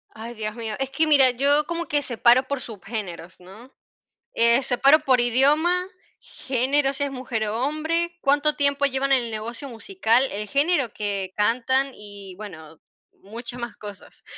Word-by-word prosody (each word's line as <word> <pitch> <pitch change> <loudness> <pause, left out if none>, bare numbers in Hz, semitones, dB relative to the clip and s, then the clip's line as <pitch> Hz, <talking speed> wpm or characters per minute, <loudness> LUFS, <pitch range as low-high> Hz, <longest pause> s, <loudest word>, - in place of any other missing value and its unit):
Ay, 230 +2 -9
dios 215 -1 -6
mío. 225 -2 -5
Es 270 -1 -2
que 310 +4 +1
mira, 270 -4 +6
yo 285 +4 +4
como 340 +1 -4
que 290 0 +1
separo 245 0 +3
por 280 -3 -4
subgéneros, 195 -6 -8
¿no?, 210 +8 -15 0.6
eh, 235 +3 +5
separo 270 +4 +3
por 260 -4 +1
idioma, 300 +9 +2 0.3
género, 270 +2 0
si 285 +1 -3
es 280 - -3
mujer 245 -4 -4
o 230 +4 -3
hombre, 335 +3 -2
cuánto 290 +2 +2
tiempo 280 -1 +1
llevan 275 0 -1
en 260 -3 +3
el 230 - -6
negocio 230 +6 -6
musical, 245 - 0
el 210 +1 -3
género 280 - 0
que 200 -3 -3
cantan 255 +5 0
y, 200 -3 -11
bueno, 160 -6 -12 0.4
muchas 235 +4 -7
más 240 0 -7
cosas. 205 -3 -12
250 Hz, 165 wpm, -22 LUFS, 220-280 Hz, 0.6 s, mira